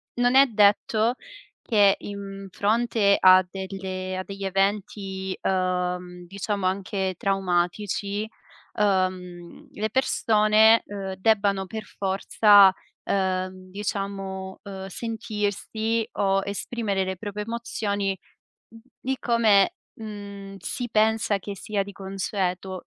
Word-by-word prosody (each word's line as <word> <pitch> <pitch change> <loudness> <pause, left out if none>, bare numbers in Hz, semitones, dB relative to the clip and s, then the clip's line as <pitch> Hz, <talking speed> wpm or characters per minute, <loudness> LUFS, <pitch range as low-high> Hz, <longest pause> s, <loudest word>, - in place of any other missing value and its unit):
non 245 +1 +2
è 275 +1 +7
detto 215 +1 +3 0.5
che 205 -4 +4
in 195 -1 -7
fronte 210 0 +2
a 185 0 +7
delle 190 0 -5
a 185 - -3
degli 195 0 -7
eventi, 195 -1 -1
uhm, 180 -1 -1
diciamo 200 +1 -3
anche 190 0 -1
traumatici, 195 +2 -1 0.5
uhm, 185 -3 -1
le 215 +1 -3
persone, 220 -3 +4
ehm, 195 -2 -5
debbano 200 -1 +2
per 220 +1 -6
forza, 200 0 +4 0.3
ehm, 185 -1 -2
diciamo, 195 -1 -4
uhm, 195 -1 -7
sentirsi 220 +1 -2
o 195 -1 +1
esprimere 200 -1 -2
le 190 0 -3
proprie 210 +1 -5
emozioni, 205 -4 -2 0.8
di 265 +1 -2
come, 230 - +3 0.2
mhmm, 200 -2 -8
si 245 -1 -4
pensa 220 -1 +2
che 200 +1 -6
sia 205 -1 -2
di 200 - -9
consueto. 190 -1 -3
200 Hz, 105 wpm, -25 LUFS, 190-215 Hz, 0.8 s, è